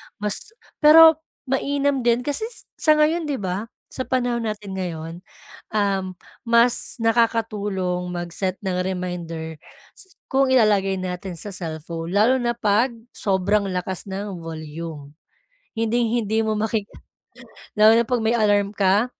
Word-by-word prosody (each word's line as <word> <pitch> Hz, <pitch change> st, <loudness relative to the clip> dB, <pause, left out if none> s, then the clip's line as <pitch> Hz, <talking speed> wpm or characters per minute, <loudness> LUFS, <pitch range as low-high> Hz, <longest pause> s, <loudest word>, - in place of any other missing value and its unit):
mas 210 Hz, -, -4 dB, 0.2 s
pero 320 Hz, +1 st, +8 dB, 0.3 s
mainam 280 Hz, +1 st, +1 dB
din 240 Hz, 0 st, +2 dB
kasi 290 Hz, -, -2 dB, 0.3 s
sa 310 Hz, -1 st, +4 dB
ngayon 310 Hz, +2 st, +2 dB
'di 290 Hz, -, -1 dB
ba 195 Hz, -1 st, -3 dB, 0.2 s
sa 260 Hz, -, -5 dB
panahon 245 Hz, -2 st, 0 dB
natin 210 Hz, -2 st, -4 dB
ngayon, 165 Hz, -3 st, -5 dB, 0.6 s
um, 195 Hz, -3 st, 0 dB, 0.4 s
mas 235 Hz, +2 st, +3 dB
nakakatulong 210 Hz, -6 st, 0 dB
mag-set 175 Hz, +2 st, -3 dB
ng 180 Hz, -1 st, -1 dB
reminder 175 Hz, -4 st, -5 dB, 0.7 s
kung 270 Hz, 0 st, +3 dB
ilalagay 210 Hz, -6 st, +3 dB
natin 185 Hz, 0 st, -5 dB
sa 205 Hz, +6 st, -6 dB
cellphone 165 Hz, -1 st, -5 dB
lalo 215 Hz, +7 st, +4 dB
na 240 Hz, -1 st, 0 dB
pag 230 Hz, +2 st, +2 dB, 0.2 s
sobrang 200 Hz, +1 st, +1 dB
lakas 185 Hz, +1 st, -4 dB
ng 190 Hz, -2 st, -5 dB
volume. 155 Hz, -2 st, -8 dB, 0.6 s
Hinding 230 Hz, +1 st, +1 dB
hindi 220 Hz, +1 st, 0 dB
mo 220 Hz, -1 st, 0 dB
maki 220 Hz, 0 st, 0 dB, 1.0 s
lalo 215 Hz, +1 st, +7 dB
na -, -, +5 dB
pag 245 Hz, +1 st, 0 dB
may 225 Hz, -, +3 dB
alarm 205 Hz, -2 st, +2 dB
ka. 200 Hz, +2 st, +3 dB
205 Hz, 130 wpm, -22 LUFS, 180-235 Hz, 1.0 s, pero